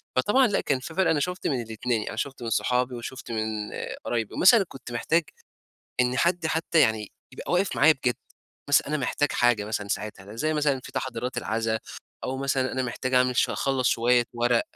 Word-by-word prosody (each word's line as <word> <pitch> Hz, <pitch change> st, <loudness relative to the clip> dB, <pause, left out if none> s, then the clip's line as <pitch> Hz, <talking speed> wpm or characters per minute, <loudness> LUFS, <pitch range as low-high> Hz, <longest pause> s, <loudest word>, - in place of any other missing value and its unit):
فطبعًا 225 Hz, -, +4 dB
لأ 205 Hz, -, 0 dB
كان 135 Hz, -2 st, 0 dB
في 145 Hz, +5 st, -8 dB
فرق 190 Hz, +1 st, +2 dB
أنا 150 Hz, -, +2 dB
شُفت 180 Hz, +5 st, -2 dB
من 130 Hz, -4 st, 0 dB
الإتنين، 115 Hz, 0 st, -2 dB
أنا -, -, -4 dB
شُفت 135 Hz, +1 st, -4 dB
من 115 Hz, -, -2 dB
صحابي 125 Hz, +2 st, +1 dB
وشُفت 120 Hz, +1 st, -7 dB
من 110 Hz, -1 st, -1 dB, 0.6 s
قرايبي، 115 Hz, -3 st, -2 dB
ومثلا 195 Hz, +2 st, +6 dB
كنت 130 Hz, -5 st, -11 dB
محتاج 160 Hz, +8 st, +1 dB, 0.8 s
إن 125 Hz, +1 st, +1 dB
حد 170 Hz, +1 st, +2 dB
حتى 160 Hz, +1 st, +1 dB
يعني 110 Hz, -6 st, +1 dB, 0.2 s
يبقى -, -, -6 dB
واقف 180 Hz, +2 st, +1 dB
معايا 155 Hz, +3 st, +7 dB
بجد، 130 Hz, -4 st, -1 dB, 0.5 s
مثلًا 145 Hz, -, +4 dB
أنا 155 Hz, -, 0 dB
محتاج 145 Hz, +1 st, 0 dB
حاجة 120 Hz, -4 st, +2 dB
مثلًا 105 Hz, -1 st, -3 dB
ساعتها، 100 Hz, +1 st, -5 dB
زي 155 Hz, +6 st, 0 dB
مثلًا 145 Hz, -3 st, +1 dB
في 130 Hz, -, -10 dB
تحضيرات 130 Hz, -2 st, -3 dB
العزا، 110 Hz, 0 st, -1 dB, 0.5 s
أو 130 Hz, -, -2 dB
مثلًا 135 Hz, -1 st, 0 dB
أنا 130 Hz, -, -1 dB
محتاج 130 Hz, +1 st, -3 dB
أعمل 125 Hz, 0 st, +3 dB
شو -, -, +2 dB
أخلَّص 135 Hz, -2 st, +1 dB
شوية 120 Hz, +1 st, +3 dB
ورق 120 Hz, 0 st, +2 dB
130 Hz, 190 wpm, -26 LUFS, 120-145 Hz, 0.8 s, معايا